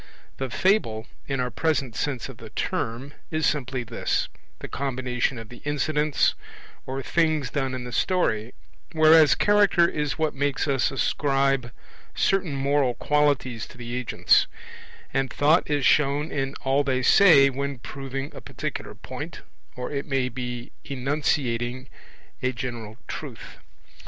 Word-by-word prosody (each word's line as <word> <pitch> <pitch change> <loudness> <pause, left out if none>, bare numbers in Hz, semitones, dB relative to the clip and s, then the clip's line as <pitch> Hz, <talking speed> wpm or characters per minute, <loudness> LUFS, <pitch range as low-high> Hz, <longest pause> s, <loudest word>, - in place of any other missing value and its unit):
The 135 -1 -3
Fable, 120 - +1 0.2
in 135 -2 -1
our 125 0 -1
present 135 -4 0
sense 135 -5 -2
of - - -10
the - - -10
term, 125 +5 -3 0.2
is 155 -1 0
simply 130 -3 0
this, 115 0 -1 0.3
the - - -7
combination 130 -2 -1
of 115 -1 -8
the 120 - -12
incidents, 150 +1 +1 0.5
or 135 +1 -3
things 155 -6 +1
done 135 -3 -1
in 125 - -5
the 125 - -7
story; 120 - 0 0.4
whereas 155 -1 +7
Character 205 -4 +4
is 150 -4 -2
what 155 -1 0
makes 145 +1 -1
us 135 -3 +2
ascribe 135 -2 +1 0.4
certain 190 -7 +1
moral 135 -2 +1
qualities 145 -6 +1
to - - -15
the 120 0 -6
agents; 125 -1 +3 0.7
and 135 -1 0
Thought 155 +4 +3
is 145 -2 +1
shown 145 +1 +3
in 135 -1 -2
all 135 +1 +2
they 130 -2 0
say 140 -4 +7
when 140 +1 -3
proving 135 +3 -6
a - - -9
particular - - -5
point - - -7 0.3
or, 125 0 -5
it 140 -1 -3
may 135 -2 0
be, 125 0 -5
enunciating 130 -2 -1 0.5
a 130 - +1
general 120 -3 -6
truth. - - -8
135 Hz, 140 wpm, -25 LUFS, 125-150 Hz, 0.7 s, whereas